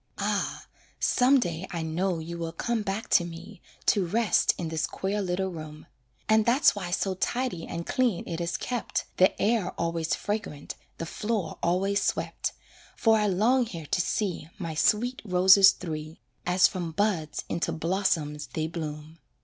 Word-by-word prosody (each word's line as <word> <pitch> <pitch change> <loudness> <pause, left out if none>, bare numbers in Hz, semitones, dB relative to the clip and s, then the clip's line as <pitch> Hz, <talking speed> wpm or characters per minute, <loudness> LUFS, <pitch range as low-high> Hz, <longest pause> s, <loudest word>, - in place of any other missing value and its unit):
Ah! - - -2 0.3
some 265 +2 +4
day 175 -4 -3
I 170 -2 -3
know 175 +3 -1
you 170 +1 -6
will 165 -1 -3
come 235 -2 -1
back 205 +1 -3
to 175 - +5
me 170 0 -9 0.2
To 200 - +3
rest 215 +5 +2
in 170 -3 -3
this 160 -1 -1
queer 200 +2 -2
little 190 0 -1
room; 155 -3 -9 0.4
And 220 0 +4
that's 245 +6 +4
why 185 -4 -4
so 190 +1 0
tidy 240 -2 -2
and 170 0 -5
clean 245 -8 0
it 170 0 -3
is 170 0 -1
kept, 245 -2 -3
The 185 - +4
air 215 -4 +1
always 165 -1 0
fragrant, 205 -9 -4 0.2
the 165 - -4
floor 210 -1 -3
always 195 +4 +1
swept, - - -1 0.4
For 225 -1 +4
I 210 -1 +2
long 230 +6 +3
here 170 -7 -7
to 175 - +1
see 180 -3 -2
My 170 -5 -4
sweet 245 - +1
roses 190 0 +7
three, 155 -4 -5 0.3
As 180 +1 +5
from 175 -4 -5
buds 180 -5 0
into 170 0 -1
blossoms 160 -3 -1
they 155 - -3
bloom. 155 -1 -6
180 Hz, 165 wpm, -27 LUFS, 165-210 Hz, 0.4 s, roses